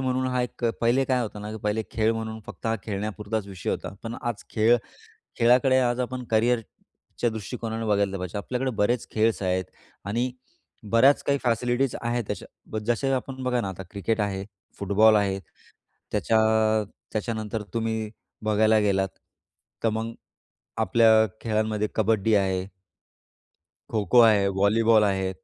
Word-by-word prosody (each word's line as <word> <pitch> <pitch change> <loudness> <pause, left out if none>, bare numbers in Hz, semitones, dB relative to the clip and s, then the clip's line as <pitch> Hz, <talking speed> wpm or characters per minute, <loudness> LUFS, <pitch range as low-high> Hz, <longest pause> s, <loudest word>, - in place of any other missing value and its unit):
म्हणून 130 0 0
हा 125 -1 0
एक 125 0 -5 0.2
पहिले 120 +3 +3
काय 130 -2 +1
होतं 105 -2 -6
ना, 105 - -5
की - - -5
पहिले 105 +1 0
खेळ 110 0 +1
म्हणून 110 -1 -5
फक्त - - -8
हा 110 - +2
खेळण्यापुरताच 105 0 -3
विषय 95 -2 -4
होता. - - -4
पण 115 0 -5
आज 120 -3 -3
खेळ, 115 +2 +4 0.6
खेळाकडे, 125 +2 +5
आज 120 0 +1
आपण 125 0 -3
करिअरच्या 115 +1 -1
दृष्टिकोनाने 115 +1 -5
बघितलं 100 -2 +1
पाहिजे. 90 +2 -4
आपल्याकडे 125 +5 -2
बरेच 120 +2 +1
खेळ्स 110 -1 +1
आहेत 95 0 0 0.4
आणि 120 +5 0 0.6
बऱ्याच 130 +5 +5
काही 140 0 +2
फॅसिलिटीज 120 +2 +1
आहेत. 120 0 -1
तश्या 110 - -7
जसं 135 +3 +1
आपण 130 +1 -6
बघा 125 -1 +1
ना, 100 - -3
आता 95 0 -6
क्रिकेट 105 +3 -1
आहे, 100 -2 -2 0.3
फुटबॉल 105 +2 +4
आहे. 100 -2 +1 0.7
त्याच्या 110 - +2 0.7
त्याच्यानंतर 110 -1 -3
तुम्ही 110 -1 -1 0.3
बघायला 110 +1 +4
गेलात, 95 -2 +1 0.8
तर - - +5
मग 110 +1 -3 0.7
आपल्या 110 +2 +5 0.2
खेळांमध्ये 110 -1 0
कबड्डी 110 0 +2
आहे. 95 -1 0 1.2
खो-खो 110 +2 +4
आहे, 110 -4 +5
व्हॉलीबॉल 105 +3 +4
आहे, 95 -2 0
110 Hz, 140 wpm, -25 LUFS, 105-120 Hz, 1.2 s, खेळाकडे